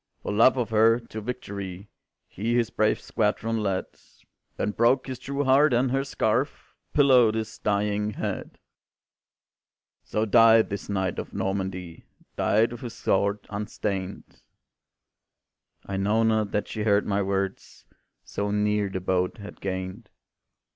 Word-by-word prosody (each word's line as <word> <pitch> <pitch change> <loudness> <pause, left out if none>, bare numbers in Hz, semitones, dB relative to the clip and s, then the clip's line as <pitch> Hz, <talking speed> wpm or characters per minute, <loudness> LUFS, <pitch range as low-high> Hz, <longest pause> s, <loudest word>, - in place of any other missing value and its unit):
"For - - -3
love 115 +5 +5
of 120 -3 -1
her, 115 +2 +5
to 115 -2 -8
victory 100 -5 -6 0.4
He 115 +5 -2
his 120 -1 +1
brave 110 0 +1
squadron 110 +1 -1
led, 95 -2 -1 0.7
Then 105 - -1
broke 120 +5 +2
his 130 -2 -6
true 140 +2 -2
heart, 135 +1 +4
and 125 +1 +2
her 135 +1 +1
scarf 130 0 -1 0.2
Pillowed 125 -6 +5
his 110 0 -4
dying 105 0 0
head. - - -5 1.5
"So 105 +1 -1
died 115 0 +5
this 100 0 -5
knight 95 -3 -1
of - - -7
Normandy, 95 -3 -4 0.3
Died 110 +3 +2
with 120 - -8
his 120 -2 -6
sword 100 +1 0
unstained;" 100 -2 -4 1.4
I 100 - -4
know 105 +4 +2
not 110 -2 +2
that 105 - -1
she 110 - -5
heard 105 -1 +3
my 100 0 0
words, 95 0 -3 0.4
So 100 0 -3
near 105 0 +1
the 95 - -3
boat 90 +2 0
had 100 -1 -11
gained. 95 +3 -5
105 Hz, 140 wpm, -26 LUFS, 100-115 Hz, 1.5 s, love